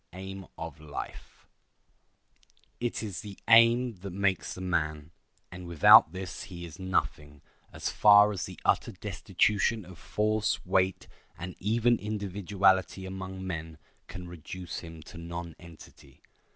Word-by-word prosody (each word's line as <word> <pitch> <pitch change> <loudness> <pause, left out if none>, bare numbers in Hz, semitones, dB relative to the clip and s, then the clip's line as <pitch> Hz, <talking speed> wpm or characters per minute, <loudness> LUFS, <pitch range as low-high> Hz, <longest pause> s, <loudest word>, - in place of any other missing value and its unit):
] - - -47
It 95 +1 -8 2.6
is 100 -5 -5
the 100 -2 -9
aim 115 0 +5
that 100 +2 -7
makes 95 0 -1
the - - -9
man, 80 -4 -2 0.4
and 90 -1 -9
without 80 -1 +7
this 95 0 -6
he 85 -2 -8
is 85 +3 -11
nothing 75 -6 -2 0.3
as - - -3
far 105 0 +7
as 95 -4 -3
the - - -10
utter 115 - +2
destitution 105 +2 0
of 90 -1 -13
force, 110 0 0
weight, 95 0 +1 0.3
and 90 +1 -7
even 115 +4 +2
individuality 100 -2 0
among 95 0 -6
men 80 -3 -5 0.3
can 90 0 -8
reduce 90 +1 -7
him 80 -2 -10
to 85 - -11
nonentity. 85 -4 -10
95 Hz, 125 wpm, -29 LUFS, 85-105 Hz, 2.6 s, without